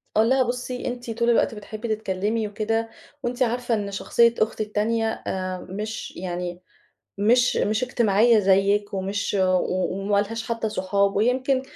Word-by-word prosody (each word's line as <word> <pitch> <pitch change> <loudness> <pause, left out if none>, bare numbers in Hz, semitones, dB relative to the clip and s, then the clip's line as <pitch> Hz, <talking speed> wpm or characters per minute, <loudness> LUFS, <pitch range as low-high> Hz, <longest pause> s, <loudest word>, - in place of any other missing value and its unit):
أقول 220 +2 +4
لها: 260 0 +4
"بُصي، 250 +1 -4
أنتِ 245 -1 -5
طُول 235 +1 0
الوقت 235 -1 +2
بتحبي 215 +2 -7
تتكلمي 210 +2 -2
وكده 225 +2 -1 0.3
وأنتِ 245 +2 0
عارفة 245 0 -1
إن 200 -2 -3
شخصية 235 +4 +3
أختي 215 0 0
التانية، 220 +2 -1
آآ 185 -1 -3
مش 215 +4 -5
يعني 175 0 -4 0.6
مش 240 +5 +3
مش 215 +3 +1
اجتماعية 230 -1 +3
زيِّك 200 +1 +2
ومش 195 +2 -2
و 190 - +3
و 185 0 0
وما 195 +1 -1
لهاش 225 +3 -4
حتى 230 -1 -1
صحاب 200 0 0
ويمْكِن 260 +4 +2
215 Hz, 155 wpm, -24 LUFS, 200-235 Hz, 0.6 s, أقول